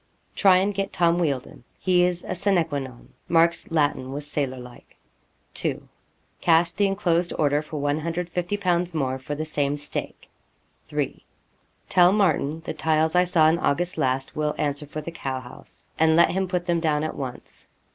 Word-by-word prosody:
Try 190 -3 +5
and 195 +2 +1
get 195 0 -2
Tom 170 0 +2
Wealdon. 140 -7 -2
He 180 -1 +3
is 180 -1 0
a - - -2
sina 185 -2 +2
que 145 -3 -3
non. 130 -3 -10 0.2
[Mark's 170 0 +3
Latin 145 -5 0
was 145 +1 -5
sailor 140 -3 -2
like.] 125 -1 -13 0.6
'2. - - -3 0.5
Cash 165 0 +4
the 200 +3 +1
enclosed 180 -3 0
order 145 -1 +2
for 150 0 -6
150_l._ 175 +4 -1
more, 130 -3 -1
for 145 +3 -5
the 155 +2 -3
same 145 -2 -1
stake. 145 - -6 0.6
'3. - - -3 0.6
Tell 180 0 +5
Martin 160 -6 +1
the - - -3
tiles 160 0 +1
I 180 0 +4
saw 165 -3 +4
in 165 +2 +3
August 175 +4 0
last 130 +1 -1
will 150 0 -1
answer 145 0 -2
for 155 +2 -6
the 170 - -7
cow 135 -5 -4
house; 125 -1 -14
and 160 0 +4
let 170 - +5
him 190 +1 -1
put 180 -1 -2
them 170 -1 +1
down 155 -2 +1
at 155 - -3
once. 130 -3 -8
160 Hz, 175 wpm, -24 LUFS, 145-175 Hz, 0.6 s, Try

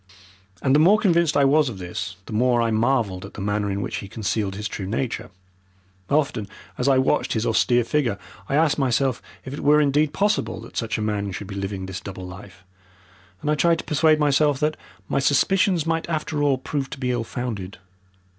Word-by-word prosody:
And 130 - +3
the 145 - +5
more 185 +7 +6
convinced 170 -7 +2
I 140 - +5
was 145 0 +4
of 110 - -7
this 90 +1 -5
the - - -8
more 120 +2 +3
I 115 -1 +1
marvelled 110 -5 +1
at 100 - -10
the - - -8
manner 105 +1 -1
in 100 0 -2
which - - -4
he 100 - -6
concealed 105 -1 -2
his 105 +1 -3
true 100 -3 -5
nature. 115 -1 -3 0.8
Often 140 -8 0 0.3
as 125 - -1
I 135 -1 +5
watched 130 +3 +1
his 110 0 -1
austere 120 +2 +3
figure, 120 -5 0 0.3
I 140 - +1
asked 155 -1 +3
myself 130 -1 +1 0.2
if 130 - -6
it 145 - -5
were 150 +1 +4
indeed 145 +1 +2
possible 200 - 0
that 115 - -13
such 115 -2 -1
a 110 - -2
man 105 -2 -2
should 100 - -6
be 100 - -8
living 95 -1 -4
this 95 -1 -6
double 95 -2 -7
life, 95 +1 -11 0.8
and 150 - +1
I - - +4
tried 165 +3 +3
to - - -5
persuade 155 +1 +3
myself 145 -1 +3
that 155 +1 +1 0.3
my - - 0
suspicions 175 +4 +2
might 165 +1 -1
after 155 -2 -2
all 140 -2 +3
prove 135 +1 -3
to - - -7
be 125 -1 -1
ill 120 -2 -1
founded. 110 -5 -5
125 Hz, 210 wpm, -23 LUFS, 105-150 Hz, 0.8 s, more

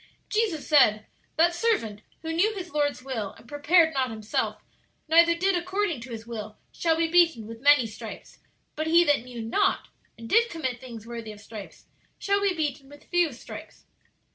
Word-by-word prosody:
"Jesus 420 -9 0
said, 215 -8 +4 0.3
'That 340 +2 +4
servant, 345 - 0 0.2
who 325 0 -3
knew 415 +6 +2
his 360 -2 -7
Lord's 290 -3 -1
will, 230 -7 -4
and - - -18
prepared 320 +3 +3
not 260 -2 0
himself, 215 -1 -3 0.4
neither 335 +1 +5
did 375 +2 +1
according 360 - -1
to 245 - -9
His 225 -1 -7
will, 215 -2 -7
shall 325 -1 0
be 330 0 +2
beaten 330 -9 +3
with 225 +1 -10
many 285 -3 +6
stripes. 220 -1 -9 0.4
But 310 +1 -2
he 340 +2 +6
that 290 -6 +2
knew 245 -2 -7
not, 380 - 0 0.3
and 230 0 -9
did 465 - +4
commit 260 -7 -4
things 235 -4 -9
worthy 230 -2 -7
of 210 - -12
stripes, 210 -1 -11 0.3
shall 400 0 0
be 395 -2 +1
beaten 285 -4 -3
with 290 0 -17
few 350 -3 +3
stripes.'" 245 - -11
290 Hz, 180 wpm, -26 LUFS, 230-345 Hz, 0.4 s, many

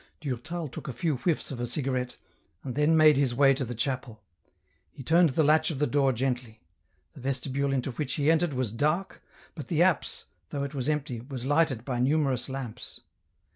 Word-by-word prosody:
Durtal 155 +4 -4
took 130 - -9
a 135 - -4
few 140 +4 -1
whiffs 160 +3 -1
of 130 - -5
a 120 - -1
cigarette, 130 -2 -2 0.5
and 130 - -4
then 150 +4 +3
made 155 -2 +7
his 135 -4 +1
way 135 +1 +6
to 135 - -2
the 120 -1 -5
chapel. 125 -2 -3 0.7
He 135 - -10
turned 165 +4 +5
the 150 +4 +2
latch 155 +2 +4
of 155 - -3
the 150 - +2
door 140 0 +2
gently; 125 -2 -2 0.5
the - - -12
vestibule 135 +1 -1
into 135 0 -1
which 140 +2 -3
he 150 +1 +3
entered 165 -1 +2
was 125 -4 -1
dark, 155 - -1 0.3
but 150 - -8
the 165 0 +3
apse, 180 -4 0 0.2
though 140 -1 -3
it 140 +1 -5
was 135 0 -2
empty, 145 -6 -2
was 130 -1 -7
lighted 145 -5 +1
by 125 -3 -2
numerous 135 -2 +1
lamps. 130 -4 -7
135 Hz, 195 wpm, -28 LUFS, 125-150 Hz, 0.7 s, made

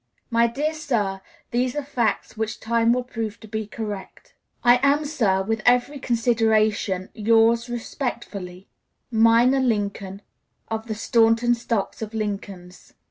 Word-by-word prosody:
My 235 0 +4
dear 290 +7 -2
sir, 225 - -2 0.3
these 245 +2 0
are 295 - -2
facts 240 -6 -1
which 220 0 -3
time 230 0 +2
will 250 +1 +1
prove 225 -3 -5
to 220 - -11
be 220 0 -4
correct. 210 -3 -7 0.3
"I 245 0 +6
am, 285 +2 +3
sir, 210 -10 +1
with 225 +2 -2
every 250 +4 +2
consideration, 220 -5 +1
yours 230 +2 +3
respectfully, 215 -7 -5 0.4
"MINOR 230 +4 +4
LINCOLN, 200 -5 -2 0.5
"Of 225 0 -4
the 220 - -3
Staunton 230 +2 +3
stock 230 -4 -2
of 220 0 -5
Lincolns." 195 -4 -6
225 Hz, 135 wpm, -23 LUFS, 210-240 Hz, 0.5 s, I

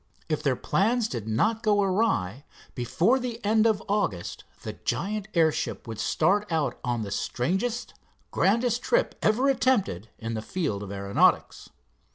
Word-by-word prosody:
If 155 -1 0
their 140 -4 +1
plans 220 - +1
did 115 - -5
not 215 - +1
go 210 -3 +2
awry, 165 - 0 0.3
before 175 - +1
the 240 -2 -4
end 220 +2 +4
of 220 -1 +1
August 195 - -2 0.2
the - - -5
giant 210 +2 -3
airship 160 -6 +1
would 110 -2 -6
start 190 - +1
out 160 -3 0
on 120 -3 -1
the 100 - -6
strangest, 190 - -2 0.4
grandest 235 +4 +2
trip - - +1
ever 235 +6 +2
attempted 235 - +1
in 115 0 -5
the 110 - -3
field 140 - -2
of 100 -1 -7
aeronautics. 100 0 +1
190 Hz, 150 wpm, -26 LUFS, -, 0.4 s, end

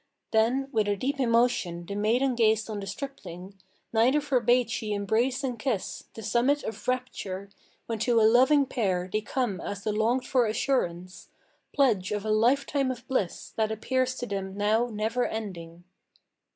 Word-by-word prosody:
Then 235 +5 +2
with 215 -5 +1
a 205 - +1
deep 275 +7 -2
emotion 230 -8 +1
the 200 - -6
maiden 235 +6 +1
gazed 220 -2 +2
on 210 - -3
the 195 - -6
stripling; 195 -6 -8 0.3
Neither 245 +6 +4
forbade 250 -4 +2
she 215 -1 -2
embrace 230 +7 0
and 250 -4 -3
kiss, 230 -6 -3
the 225 - -8
summit 255 +7 +2
of 220 - -6
rapture, 200 -6 -3 0.3
When 225 -1 -3
to 230 +1 +3
a - - +4
loving 260 +6 +5
pair 185 -8 -1
they 215 - +1
come 215 -5 -2
as 200 -1 -5
the 215 - -1
longed 230 +4 +1
for 250 -3 +2
assurance, 185 -7 -2 0.4
Pledge 220 -10 +2
of 210 0 -2
a 215 - 0
lifetime 265 +5 +2
of 250 -1 -6
bliss, 205 -10 -2
that 220 -1 +1
appears 255 +4 0
to 245 - -4
them 195 -2 -4
now 215 +3 +2
never 225 +2 -1
ending. 175 -6 -6
225 Hz, 165 wpm, -27 LUFS, 205-255 Hz, 0.4 s, loving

